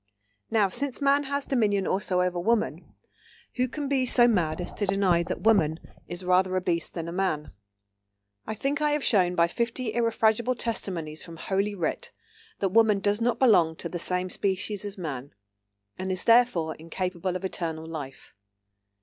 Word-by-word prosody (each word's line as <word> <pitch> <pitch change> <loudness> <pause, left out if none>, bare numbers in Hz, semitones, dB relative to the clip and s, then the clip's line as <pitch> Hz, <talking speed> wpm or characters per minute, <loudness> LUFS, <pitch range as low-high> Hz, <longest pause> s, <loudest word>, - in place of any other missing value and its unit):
Now, 215 -3 +3
since 275 +7 -1
man 280 0 +2
has 280 +1 -2
dominion 205 -7 +1
also 185 -1 0
over 180 -1 -1
woman, 225 +5 -1 0.6
who 255 +1 +1
can 290 +3 -5
be 265 -2 +1
so 240 0 +7
mad 175 -9 +1
as 175 - -5
to 205 - -2
deny 190 -3 +2
that 170 - -4
woman 170 -8 +3 0.3
is 175 +1 -6
rather 185 +1 +2
a 185 - +1
beast 170 -2 -2
than 165 -1 -4
a - - -5
Man?… 175 -5 -2 1.0
"I 220 - -3
think 280 +7 -2
I 300 -1 +2
have 295 -2 -1
shown 180 -5 +3
by 170 0 +4
fifty 235 +3 -3
irrefragable 230 +1 +1
testimonies 175 -10 -2
from 165 -1 -10
Holy 200 +4 -1
Writ 200 - -3 0.5
that 195 - 0
woman 220 +1 +4
does 205 +3 0
not 235 0 +1
belong 180 -11 +4
to 170 - -6
the 175 - -5
same 180 +1 -1
species 200 +1 -1
as 205 0 -5
man, 140 - -6 0.6
and 190 0 -3
is 185 - 0
therefore 230 -9 +3
incapable 180 +2 -4
of 185 +1 -4
eternal 160 -4 -3
life." 150 -5 -8
190 Hz, 175 wpm, -26 LUFS, 175-230 Hz, 1.0 s, so